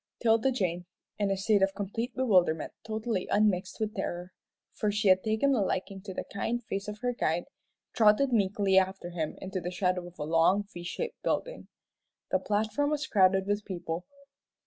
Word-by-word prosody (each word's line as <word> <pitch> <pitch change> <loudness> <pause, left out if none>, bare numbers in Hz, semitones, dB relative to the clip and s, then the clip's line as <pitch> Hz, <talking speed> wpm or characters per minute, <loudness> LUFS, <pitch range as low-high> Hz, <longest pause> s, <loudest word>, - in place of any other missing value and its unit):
'Tilda 225 +2 +3
Jane, 180 -7 -2 0.3
in 205 -1 +1
a 195 - 0
state 200 +1 +2
of 195 0 +2
complete 225 +5 -4
bewilderment 180 -11 +2
totally 220 -3 -2
unmixed 205 -2 +1
with 215 -1 -1
terror, 180 -3 -4 0.4
for 210 - 0
she 210 -1 +2
had 185 0 +5
taken 220 +6 +2
a 240 - +2
liking 195 0 -2
to 195 0 -7
the - - -4
kind 235 +4 -3
face 195 -1 -4
of 210 0 -5
her 245 0 0
guide, 170 -6 0 0.5
trotted 230 +4 +4
meekly 200 -2 +3
after 190 -2 -3
him 160 -3 -3
into 190 -1 -4
the 175 - -3
shadow 180 -1 -1
of 175 - -14
a 150 - -3
long 165 +6 +3
V 175 - -7
shaped 475 - -5
building. - - -2 0.6
The - - +3
platform 215 +7 0
was 300 0 -1
crowded 190 -4 +4
with 205 +1 -1
people. 175 -3 -5
200 Hz, 180 wpm, -29 LUFS, 185-220 Hz, 0.6 s, had